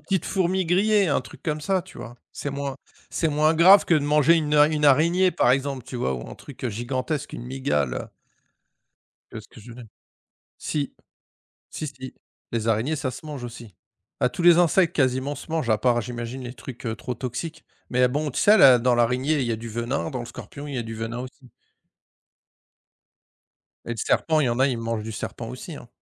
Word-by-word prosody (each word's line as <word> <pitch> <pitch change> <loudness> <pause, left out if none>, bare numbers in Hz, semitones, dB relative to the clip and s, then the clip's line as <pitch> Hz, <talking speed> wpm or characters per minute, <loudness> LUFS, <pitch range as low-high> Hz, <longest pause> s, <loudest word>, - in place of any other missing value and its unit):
petite 180 +5 -1
fourmi 190 -1 0
grillée, 200 +2 +3
un 145 - +2
truc - - -14
comme 150 -1 -2
ça, 190 +3 0
tu 190 - -14
vois? 120 - -8 0.2
C'est 145 - -5
moins 140 -1 -4 0.3
c'est 165 - 0
moins 155 +2 +3
grave 185 +5 +7
que 170 - +3
de 155 - +5
manger 150 +2 +4
une 150 -2 0
a 150 0 +7
une 150 -1 -1
araignée, 170 +7 +4
par 120 - +2
exemple, 135 -1 0
tu 130 -1 -7
vois 65 - -1
ou - - -7
un - - -8
truc 130 -2 -8
gigantesque, 130 +6 -3
une - - -7
mygale. 125 - -2 1.2
Tu - - -9
vois - - -5
ce - - -19
que - - -15
je 110 - -15
veux - - -10
dire? 125 -2 -11 0.7
Si, 145 -2 -3 0.8
si, 155 - -5
si 130 -2 -9 0.4
les 115 -1 -1
araignées, 115 +8 +1
ça 140 -3 -2
se 125 - -10
mange 145 -5 -6
aussi. 115 -4 -9 0.5
Ah - - +3
tous 145 +7 -5
les 175 -1 +7
insectes 175 0 +3
quasiment 130 +1 +1
se 145 - -11
mangent, 155 -8 -1
à 110 - +3
part 120 0 +2
j'imagine 120 +2 -6
les 125 +1 -7
trucs, 125 -1 -9
heu, 110 - -1
trop 125 +3 -5
toxiques 130 +7 -6 0.3
mais 125 0 +2
à - - +4
bon 145 +4 -2
tu - - -4
sais 205 - +6
à 220 - +7
la 130 -8 +8
dans 125 +1 +2
l'araignée 125 +5 +1
il 125 - -1
y - - -1
a 115 - 0
du 115 +1 -8
venin, 120 +7 -2
dans 130 -4 -4
le 120 - -6
scorpion, 125 +5 -9
il 140 - -6
y - - -1
a 120 - -1
du 115 - -6
venin 115 +2 -5
aussi. 130 0 -10 2.4
Et - - -5
le 115 - -3
serpent 155 +6 +1
il 135 - +2
y - - +2
en 120 - -1
a, 135 - +5
ils 125 -4 -1
mangent 115 -1 -3
du 110 +1 -6
serpent 115 +2 -6
aussi, 125 +7 -8
hein. - - -12
130 Hz, 225 wpm, -24 LUFS, 120-155 Hz, 2.4 s, la